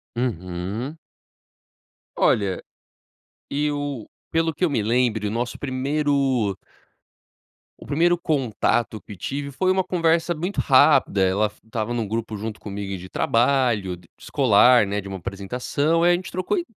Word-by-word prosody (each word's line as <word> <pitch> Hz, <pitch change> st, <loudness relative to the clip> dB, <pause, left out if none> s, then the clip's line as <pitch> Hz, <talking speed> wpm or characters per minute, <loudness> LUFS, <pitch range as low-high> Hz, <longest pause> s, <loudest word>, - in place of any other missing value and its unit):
Uhum. 105 Hz, -, -3 dB, 1.2 s
Olha, 100 Hz, -3 st, +2 dB, 0.9 s
eu 145 Hz, -4 st, -2 dB, 0.2 s
pelo 165 Hz, 0 st, +1 dB
que 180 Hz, -, 0 dB
eu -, -, 0 dB
me 125 Hz, -6 st, 0 dB
lembre, 115 Hz, -2 st, +1 dB
o 105 Hz, -, -1 dB
nosso 120 Hz, +2 st, -3 dB
primeiro 135 Hz, -5 st, 0 dB, 1.2 s
o -, -, -12 dB
primeiro 170 Hz, +6 st, +2 dB
contato 120 Hz, -, 0 dB
que 105 Hz, -, -11 dB
tive 140 Hz, +9 st, -4 dB
foi 185 Hz, +7 st, +1 dB
uma 190 Hz, 0 st, +2 dB
conversa 170 Hz, -1 st, +1 dB
muito 175 Hz, +6 st, -3 dB
rápida 135 Hz, -6 st, +4 dB
ela 95 Hz, +3 st, +2 dB
f 105 Hz, 0 st, -7 dB
estava 110 Hz, +1 st, -3 dB
num 115 Hz, -3 st, -2 dB
grupo 115 Hz, 0 st, -3 dB
junto 110 Hz, +1 st, -5 dB
comigo 100 Hz, -1 st, -5 dB
de 90 Hz, +1 st, -10 dB
trabalho 115 Hz, -5 st, +1 dB
d 85 Hz, -1 st, -19 dB
escolar, 125 Hz, -3 st, +5 dB
né, 100 Hz, +1 st, -1 dB
de 100 Hz, -, -7 dB
uma 95 Hz, 0 st, -5 dB
apresentação, 125 Hz, -, -1 dB
aí 175 Hz, -, +5 dB
a -, -, +4 dB
gente 180 Hz, 0 st, -6 dB
trocou 185 Hz, -, -1 dB
i 345 Hz, -, -2 dB
125 Hz, 145 wpm, -23 LUFS, 105-150 Hz, 1.2 s, escolar